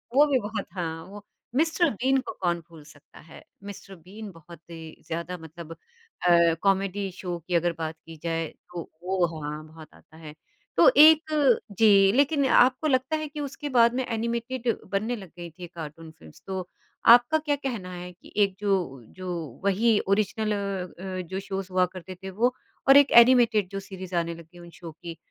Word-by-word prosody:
वो 295 +2 +7
भी 270 -3 +2
बहुत 210 0 -4
हाँ 165 -2 -4
वो 205 +1 -12 0.3
मिस्टर 325 +2 +2
बीन 265 +5 +1
को 250 - -7
कौन 175 -1 0
भूल 160 -3 -14
सकता 145 -1 -18
है, - - -13 0.2
मिस्टर 200 -1 -10
बीन 195 +5 -11
बहुत 165 -1 -14
ही 160 -1 -10
ज़्यादा 170 +2 -4
मतलब 160 0 -11
अ, 175 - 0
कॉमेडी 195 0 0
शो 180 -1 -5
की 175 - -1
अगर 170 +1 +2
बात 160 0 -4
की 165 -1 -11
जाए, 165 -1 -2
तो 170 +1 -10
वो 185 -1 +1 0.2
हाँ, 150 +1 -5
बहुत 155 0 -13
आता 160 - -20
है। 155 -2 -10 0.4
तो - - +7
एक 305 -4 +6 0.2
जी 200 -3 +6
लेकिन 280 +3 +2
आपको 260 +4 +4
लगता 260 +3 +1
है 310 0 -4
कि 295 +1 -9
उसके 290 +1 -5
बाद 235 0 +5
में 260 -1 -1
एनिमेटेड 235 +2 -3 0.2
बनने 220 +5 -1
लग 190 -6 -10
गईं 170 -1 -8
थी 175 - -7
कार्टून 160 0 -9
फ़िल्म्स, 80 - -17
तो 190 -2 -4 0.5
आपका 245 +6 +4
क्या 300 -2 -1
कहना 235 -10 -5
है 180 0 -8
कि 175 - -18
एक 195 -2 -1
जो 205 -1 -1 0.5
जो 185 -1 -6 0.4
वही 210 +3 +3
ओरिजिनल 215 +2 0
अ 195 -3 -4
अ, 185 -1 -4
जो 190 +2 -4
शोज़ 195 -1 -5
हुआ 185 0 +3
करते 185 0 -9
थे, 190 +2 -9
वो 240 +6 +1 0.4
और 275 - +9
एक 285 -1 +5
एनिमेटेड 230 -6 +3
जो 195 - -4
सीरीज़ 190 -2 -8
आने 170 0 -1
लग 170 - -12
गई 175 - -14
उन 170 0 -12
शो 170 -2 -8
की, 165 +1 -10
195 Hz, 190 wpm, -26 LUFS, 170-240 Hz, 0.5 s, और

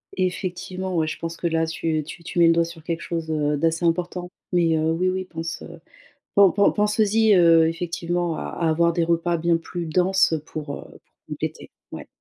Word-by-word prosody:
Effectivement 185 0 -3
ouais, 160 -1 +1
je - - -5
pense 165 0 -4
que 170 - -2
là 165 0 +1
tu 160 -1 -2
tu 170 +3 -10
tu 175 - -3
mets 170 - +7
le 165 - +6
doigt 170 0 +3
sur 165 -1 -9
quelque 165 0 -3
chose, 165 -2 -4
heu, 150 -1 0
d'assez 165 +3 0
important 175 +1 -1 0.2
mais 165 -2 +3
heu, 160 +1 +1
oui, 185 +3 +1
oui 185 0 -2
pense 165 -1 -6 0.7
pen 195 -3 +7
pen 200 0 +4
penses-y, 210 0 +3
heu, 165 -2 +6
effectivement 170 0 -2
à - - -5
à 170 - -2
avoir 170 +1 +3
des 170 0 +1
repas 170 +1 0
bien 170 +1 +2
plus 170 +1 -6
denses 180 +1 +2
pour, 150 -2 -6
heu, - - -9 0.2
pour - - -44
compléter, - - -5 0.2
ouais. - - -8
170 Hz, 200 wpm, -23 LUFS, 165-180 Hz, 0.7 s, mets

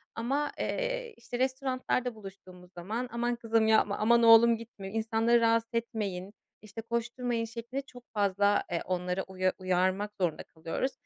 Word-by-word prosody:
ama, 275 +6 -1
eee, - - -2
işte, 245 +1 -6
restoranlarda 255 -2 -1
buluştuğumuz 185 -3 -13
zaman 220 +8 -4
aman 240 +1 -1
kızım 225 -1 +1
yapma, 220 -2 +3
aman 235 +2 +4
oğlum 230 0 +7
gitme, 220 -4 -9
insanları 225 +1 +2
rahatsız 230 0 +2
etmeyin, 205 -4 -3 0.3
işte, 220 +1 -8
koşturmayın 235 0 -2
şeklinde 235 +4 -5
çok 250 -2 -15
fazla, 205 0 +2
eee, 170 - -1
onları 180 +1 -1
uya 185 0 0
uyarmak 185 +2 0
zorunda 170 -3 0
kalıyoruz. 165 +11 -3
225 Hz, 140 wpm, -30 LUFS, 195-240 Hz, 0.3 s, oğlum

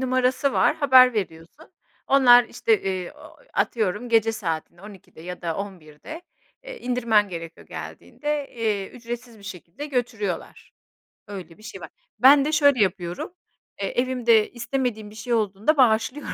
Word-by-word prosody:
numarası 255 +1 +1
var - - +2
haber 255 -3 +6
veriyorsun. 185 - -6 0.3
Onlar 245 -3 +6
işte, 440 - 0
eee, 185 -2 -3
ooo, - - -16 0.2
atıyorum 215 +1 -1
gece 225 -1 +3
saatinde 170 -3 -5
12'de 200 -6 -14
ya 180 +1 -8
da 165 -2 -2
11'de, 195 - -8 0.4
eee, - - -9
indirmen 235 -5 +1
gerekiyor 165 -2 -9
geldiğinde, 295 -1 -5
eee, 215 -4 -2
ücretsiz 240 -1 -8
bir 200 - -17
şekilde 185 - -8
götürüyorlar. 235 - -4 0.6
Öyle 185 -5 -9
bir 215 - -19
şey 225 - -9
var. - - -9 0.3
Ben 275 +2 +7
de 305 - -1
şöyle 285 -5 +4
yapıyorum, 180 - -4 0.5
eee, 195 - -1
evimde 240 -4 +2
istemediğim 240 -3 -3
bir 215 - -15
şey 235 +3 -4
olduğunda 215 +6 +1
bağışlıyorum 245 +3 +2
225 Hz, 145 wpm, -24 LUFS, 195-255 Hz, 0.6 s, Ben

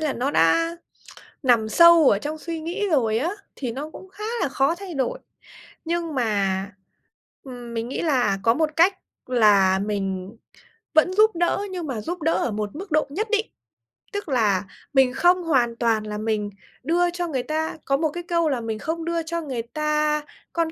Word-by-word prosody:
là 305 -3 0
nó 260 +4 -1
đã 330 - +3 0.7
nằm 235 -5 +3
sâu 335 0 +7
ở 200 - +3
trong 305 +7 -5
suy 330 0 -5
nghĩ 370 +6 -2
rồi 225 -8 +2
á, 310 +8 -1 0.3
thì 250 -4 -4
nó 290 +6 -6
cũng 375 - -12
khá 425 - -9 0.2
là - - +1
khó 275 +4 +1
thay 370 -2 -8
đổi. 290 - -1 0.7
Nhưng 335 -2 -2
mà, 200 -6 0 0.8
ừm, 245 -3 -9
mình 230 +1 -3
nghĩ - - -3
là 250 -11 +1
có 230 - +4
một 310 +3 +1
cách 370 +4 +4 0.3
là 205 -6 +4
mình 195 -1 -3 0.6
vẫn 315 +4 +4
giúp 430 0 +4
đỡ, 345 +3 +1
nhưng 355 -4 -4
mà 245 -6 -3
giúp 345 +9 -5
đỡ 325 +2 +2
ở 245 - 0
một 210 -1 -3
mức 380 +3 -8
độ 310 0 +3
nhất 415 +11 -2
định. 435 0 +1 0.7
Tức 405 -5 -4
là 210 -8 +2 0.3
mình 265 -2 +4
không 355 +5 +3
hoàn 250 -8 +2
toàn 230 -2 +1
là 210 0 -5
mình 215 -1 -1 0.3
đưa 345 +5 +2
cho 350 0 -3
người 265 -6 -2
ta, 315 +3 -2
có 275 0 +2
một 315 +1 +1
cái 345 +4 -6
câu 335 -2 +1
là 260 -4 -1
"Mình 220 -1 -4
không 325 +1 -3
đưa 335 0 -1
cho 335 +1 -3
người 260 -7 -4
ta 300 +3 0 0.3
con 335 -1 0
290 Hz, 195 wpm, -23 LUFS, 230-335 Hz, 0.8 s, sâu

